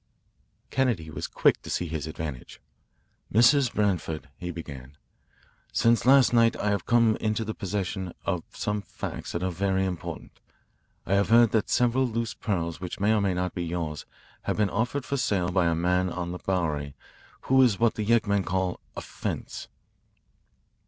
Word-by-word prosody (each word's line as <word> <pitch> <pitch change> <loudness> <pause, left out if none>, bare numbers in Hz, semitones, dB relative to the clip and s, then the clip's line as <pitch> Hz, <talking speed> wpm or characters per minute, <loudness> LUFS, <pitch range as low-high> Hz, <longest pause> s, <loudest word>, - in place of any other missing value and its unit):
Kennedy 115 -13 0
was - - -4
quick - - +2
to - - -10
see 90 - -1
his 80 -2 -4
advantage. 80 -5 -6 0.7
"Mrs. 120 +4 +5
Branford," 85 -7 -1
he 90 - -5
began, 70 -5 -8 0.7
"since 115 +1 +2
last 135 -2 +6
night 115 -1 +5
I 105 - 0
have 100 -4 -2
come 115 -2 +4
into 110 0 -1
the 110 - -3
possession 95 -2 -3
of 90 -2 -1
some 105 0 -2
facts - - -6
that 85 - -2
are 95 - 0
very 95 +2 0
important. 90 -3 -6 0.7
I 95 - 0
have 100 -1 +2
heard 115 -1 +6
that 110 - +1
several 125 +2 +2
loose 115 -1 -2
pearls 85 -7 -3
which 90 - -5
may 105 +2 +3
or 105 - +2
may 95 -2 +1
not 90 0 -2
be 90 - -3
yours 80 -4 -4 0.4
have - - -1
been 105 -3 +1
offered 125 +5 -1
for 140 - -1
sale 100 -8 0
by 90 -2 +2
a 85 - +2
man 90 +2 +1
on 85 0 -4
the 90 - -6
Bowery 75 -7 -2 0.5
who 130 0 +4
is 120 -6 +4
what 115 -1 +3
the 110 - -3
yeggmen 105 -3 +2
call 95 -1 -1 0.2
a - - -4
'fence.'" - - -5
95 Hz, 170 wpm, -27 LUFS, 85-115 Hz, 0.7 s, last